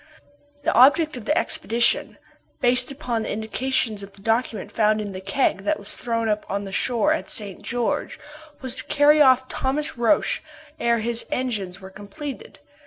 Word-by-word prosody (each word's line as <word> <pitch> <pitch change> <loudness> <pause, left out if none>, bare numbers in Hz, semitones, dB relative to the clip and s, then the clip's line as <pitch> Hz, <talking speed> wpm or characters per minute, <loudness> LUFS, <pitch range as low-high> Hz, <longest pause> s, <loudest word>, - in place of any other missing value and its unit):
The - - +1
object 290 +5 +5
of 240 -4 -8
the 300 +5 +1
expedition, 240 -9 +1 0.4
based 250 +1 +2
upon 250 -5 -3
the - - -4
indications 220 0 -1
of 200 0 -10
the 195 - -17
document 225 -2 -1
found 215 -1 +2
in 205 -1 -4
the 185 0 -7
keg 195 +2 +1
that 200 - 0
was 200 - -7
thrown 230 -1 -2
up 210 -1 0
on 200 +1 -2
the 195 - -7
shore 250 +9 +1
at 320 - -4
St. 200 -4 -2
George, 240 0 -2 0.4
was 260 -2 -2
to - - -1
carry 295 +1 +4
off 260 -2 +5
Thomas 290 +2 -2
Roch 240 +6 +2 0.4
ere 235 -1 +2
his 235 +1 -1
engines 210 -8 -3
were 190 0 -10
completed. 210 +9 -8
235 Hz, 175 wpm, -23 LUFS, 210-265 Hz, 0.4 s, object